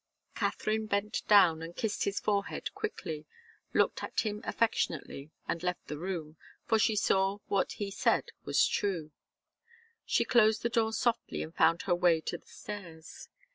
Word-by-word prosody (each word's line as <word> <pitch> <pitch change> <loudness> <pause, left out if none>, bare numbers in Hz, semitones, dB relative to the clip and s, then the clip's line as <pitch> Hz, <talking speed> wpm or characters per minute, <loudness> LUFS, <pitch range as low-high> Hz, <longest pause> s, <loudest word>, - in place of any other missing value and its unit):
Katharine 215 0 -1
bent 200 +1 -1
down 180 -6 +6
and 165 +1 -7
kissed 220 -2 -1
his 200 0 -1
forehead 200 -1 -1
quickly, 165 - -5 0.4
looked - - +2
at - - -1
him 210 -1 -3
affectionately 155 -9 -1 0.2
and 170 - -2
left 180 0 -2
the 150 - -6
room, 165 -4 -4 0.3
for 225 -1 +3
she 215 0 +3
saw 195 -1 +2
that 205 - -34
what 200 -1 +2
he 200 -1 -4
said - - +1
was - - +3
true. 175 -7 -1 0.9
She - - +1
closed 220 -3 +4
the 235 - +1
door 225 -1 +1
softly 235 +1 0
and 160 - -9
found 165 0 +3
her 180 - +1
way 175 -2 +4
to - - -4
the - - -31
stairs. 170 -6 -9
195 Hz, 165 wpm, -31 LUFS, 165-215 Hz, 0.9 s, down